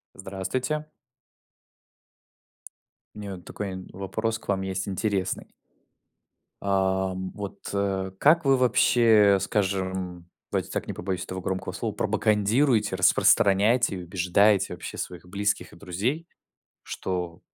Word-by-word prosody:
Здравствуйте. 100 +11 -3 2.3
У - - -9
меня 100 -2 -5
вот 90 - -14
такой, 105 - -5
м, 95 0 -8
вопрос 110 +4 -2
к - - -19
вам 100 -1 0
есть 95 0 -3
интересный. 100 -1 -2 1.1
Ам, 95 -1 0
вот, 100 -1 -7
э, 95 -1 -1
как 160 +1 +5
вы 135 -1 +5
вообще, 115 -4 +5
скажем, 95 -3 -2 0.2
давайте - - -1
так, - - -3
не - - -3
побоюсь 90 0 -3
этого 95 0 -5
громкого 95 +1 -3
слова, - - -3
пропагандируете, 105 0 +2
распространяете 100 +4 +4
и 90 - -6
убеждаете 95 +3 +2
вообще - - -7
своих 90 -1 -6
близких 100 +2 -1
и - - -13
друзей, 110 - -3 0.6
что 90 -3 -4
100 Hz, 120 wpm, -26 LUFS, 95-105 Hz, 2.3 s, как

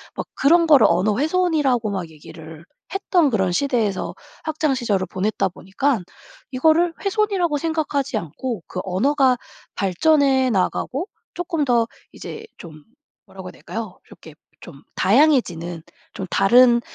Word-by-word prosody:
막 - - -5
그런 335 +4 +4
거를 280 -9 +6
언어 205 +3 +1
훼손이라고 300 -7 +1
막 185 -5 -4
얘기를 160 +1 -12 0.3
했던 365 -5 +2
그런 190 -5 +1
시대에서 225 -3 -1 0.3
학창시절을 260 -11 -1
보냈다 195 +1 -1
보니깐 195 +6 -2 0.5
이거를 320 +6 +3
훼손이라고 395 -6 0
생각하지 300 -3 -2
않고 200 - -5
그 185 - -6
언어가 255 +7 +2 0.4
발전해 265 - +2
나가고 255 - -1 0.3
쪼끔 335 -4 -2
더 235 -3 +2 0.2
이제 445 0 -9
좀 155 -3 -12 0.4
뭐라고 190 -1 -11
해야 - - -10
될까요? 220 -4 -7
이렇게 160 -2 -15 0.2
좀 140 -5 -13
다양해지는 185 - +2 0.3
좀 190 - -5
다른 240 +4 +5
250 Hz, 300 characters per minute, -21 LUFS, 190-305 Hz, 0.5 s, 거를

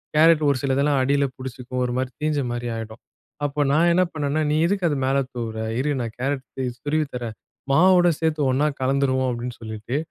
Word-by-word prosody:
Carrot 160 0 +5
ஒரு 140 - +2
சிலதெல்லாம் 140 +1 +2
அடியில 140 +1 +2
பிடிச்சிக்கும். 130 0 -5
ஒரு 120 - -2
மாரி 130 0 -1
தீஞ்ச 150 -1 +1
மாரி 120 0 -3
ஆயிடும். 110 0 -7 0.4
அப்போ 145 +1 -1
நான் 165 +4 +4
என்ன 185 +1 +4
பண்ணேன்னா 150 0 -1
நீ - - +2
எதுக்கு 190 0 0
அதை 145 -3 0
மேல 135 +1 +2 0.2
தூவுற? 115 -2 -4 0.2
இரு 150 +2 0
நான் 115 -2 -4
கேரட் 135 0 -1 0.4
துருவித் 150 0 0
தரேன், 115 -3 -5 0.4
மாவோட 175 +3 +5
சேத்து 160 -2 0
ஒண்ணா 145 +4 +2
கலந்துருவோம் 130 -1 +1
அப்டின்னு 120 0 -5
சொல்லிட்டு, 110 +4 -4
140 Hz, 180 wpm, -23 LUFS, 125-150 Hz, 0.4 s, கேரட்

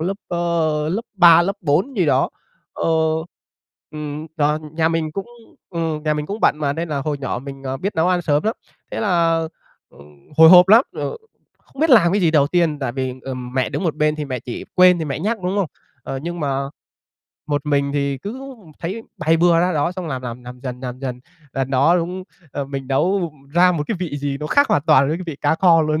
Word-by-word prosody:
lớp, 185 +5 -2
ơ, 165 -3 0
lớp 195 +8 -1
3, 170 -2 +7
lớp 195 +3 -2
4 180 - 0
gì 180 -5 +2
đó, 135 -1 +2 0.4
ơ, - - -5 1.1
ưm, 150 0 -6
do 150 +1 +2
nhà 160 0 +1
mình 165 -2 -1
cũng 195 +4 -5 0.4
ừm, 165 -3 -2
nhà 155 -1 +1
mình 150 0 -3
cũng 205 +5 -5
bận 150 - +3
mà 145 -2 0
nên 165 +3 -4
là 145 -2 -2
hồi 145 0 -3
nhỏ 135 -3 -3
mình, 135 +1 -9
ờ, 130 0 -3
biết 195 +9 -3
nấu 160 +2 +2
ăn 180 -1 +1
sớm 150 -2 +1
lắm, 220 +2 0 0.4
thế - - -4
là, 170 -5 +2 0.5
ừm, 70 -1 -19
hồi 160 0 +9
hộp 180 0 +8
lắm, 225 +5 +7
ờ, - - -4 0.4
không 275 - -14
biết 320 - +3
làm 190 -8 +6
cái 205 - +2
gì 170 -4 +3
đầu 145 -3 +4
tiên 165 -2 +1
tại 135 -4 -3
vì, 130 -1 -3
ừm, 125 -2 -6
mẹ 130 -1 +1
đứng - - -4
một 165 - 0
bên 150 0 +1
thì 150 - -3
mẹ 130 -3 -4
chỉ, 120 - -7
quên 180 -1 +6
thì 160 - -2
mẹ 140 -1 -3
nhắc, 220 +7 -1
đúng 185 +3 -1
hông? 200 - +1 0.4
Ờ, 135 - -5
nhưng 175 +1 -5
mà 140 -2 -1 0.8
một 145 -1 -2
mình 140 -1 +1
thì 140 -2 -1
cứ 260 - -7 0.3
thấy 190 +7 -5 0.2
bày 165 +1 +2
bừa 170 0 +4
ra 180 +1 +1
đó 155 +3 0
xong 180 -2 -6
làm, 130 -3 -4
làm, 125 0 -6
làm 125 0 -10
dần, 125 -2 -6
làm 125 -1 -6
dần. 125 -2 -5 0.3
Lần 135 -1 -2
đó 140 +6 +4
đúng, 180 +2 -3 0.3
ờ, 140 - -3
mình 135 -1 -6
nấu 170 +5 +1 0.2
ra 180 +1 +5
một 160 -4 -1
cái 220 - -1
vị 160 -6 -3
gì 140 -1 -2
nó 150 - -3
khác 285 - +3
hoàn 145 - +2
toàn 145 -3 +4
với 155 - 0
cái 180 - -7
vị 160 -4 -5
cá 145 +2 +2
kho 165 -2 +4
luôn. 155 0 0
155 Hz, 235 wpm, -20 LUFS, 140-175 Hz, 1.1 s, hồi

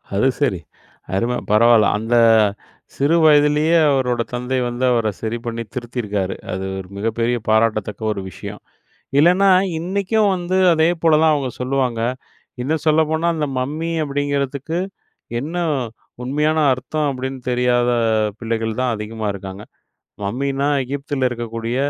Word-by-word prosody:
அது 105 +7 +3
சரி, 115 -11 +1 0.6
அரும 115 +5 0 0.2
பரவால. 115 +1 +6
அந்த 115 +3 -1 0.8
சிறு 145 +4 +2
வயதிலயே 150 +2 +4
அவரோட 125 -3 +1
தந்தை 125 +2 -2
வந்து 120 +1 -4
அவர 115 -2 +1
சரி 115 +1 -2
பண்ணி 115 0 -3
திருத்தியிருக்காரு. 105 -6 -3 0.2
அது 95 +1 -3
ஒரு 95 - -8
மிகப்பெரிய 115 +3 0
பாராட்டத்தக்க 110 -1 +1
ஒரு 100 - -5
விஷயம். - - -9 0.6
இல்லன்னா, 180 +5 +5 0.3
இன்னைக்கும் 200 +4 +1
வந்து 180 +1 -2 0.2
அதே 160 0 +3
போல 160 -2 +5
தான் 160 -1 +5
அவங்க 135 -3 -2
சொல்லுவாங்க. 125 -3 0 0.6
இன்னும் 155 +5 -1
சொல்ல 155 +1 +5
போனா, 160 +2 0
அந்த 150 -2 -1
மம்மி 155 +6 -3
அப்டிங்கிறதுக்கு 145 +2 -2 0.6
என்ன 155 +7 -5 0.7
உண்மையான 150 +4 +1
அர்த்தம் 150 +4 -2
அப்டின்னு 130 0 -5
தெரியாத 125 0 +2 0.5
பிள்ளைகள் 115 -1 -2
தான் 125 -2 +1
அதிகமா 110 +1 -5
இருக்காங்க. 95 +1 -8 0.6
மம்மினா 135 +6 -1 0.2
எகிப்தில 140 0 -2
இருக்கக்கூடிய 115 0 -4
130 Hz, 125 wpm, -20 LUFS, 115-150 Hz, 0.8 s, பரவால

